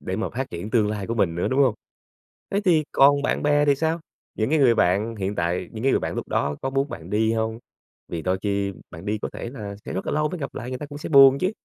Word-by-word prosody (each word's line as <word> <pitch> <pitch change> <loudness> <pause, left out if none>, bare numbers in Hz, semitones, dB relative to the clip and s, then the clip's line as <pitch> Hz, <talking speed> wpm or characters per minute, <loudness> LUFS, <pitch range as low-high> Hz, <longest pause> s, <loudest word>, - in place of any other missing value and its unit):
để 95 - -4
mà 110 - -2
phát 130 +2 -4
triển 85 +5 -6
tương 110 -3 +2
lai 105 -2 -4
của 115 - -2
mình 95 -7 +1
nữa, 85 - -1
đúng 130 +2 +1
hông? 130 -5 +3 0.8
Thế 200 - +1
thì 165 -4 +4
còn 140 +1 +5
bạn - - -1
bè 145 0 +3
thì 145 -1 +4
sao, 160 +3 0 0.4
những 110 +2 0
cái 155 +1 +2
người 125 -4 +5
bạn 100 +5 +1
hiện 100 0 -3
tại, 90 +1 -1
những 110 0 -7
cái 135 - +3
người - - +3
bạn - - -4
lúc - - -4
đó 70 0 0
có 135 - -1
muốn 135 +1 0
bạn - - -8
đi 110 +2 +2
hông? 110 0 -2 0.5
Vì 85 - -4
đôi 90 +3 0
khi 100 -1 -1 0.2
bạn 80 +4 -10
đi 105 +1 -1
có - - -5
thể - - -6
là 105 -6 -7
sẽ - - -5
rất 95 - -3
là - - -2
lâu 150 +1 +1
mới 180 - -5
gặp 140 -3 -6
lại, 125 - -5
người 130 0 -5
ta - - -5
cũng 145 0 -9
sẽ 150 - -6
buồn 135 -2 +8
chứ. 185 +2 +1
115 Hz, 290 wpm, -24 LUFS, 100-140 Hz, 0.8 s, buồn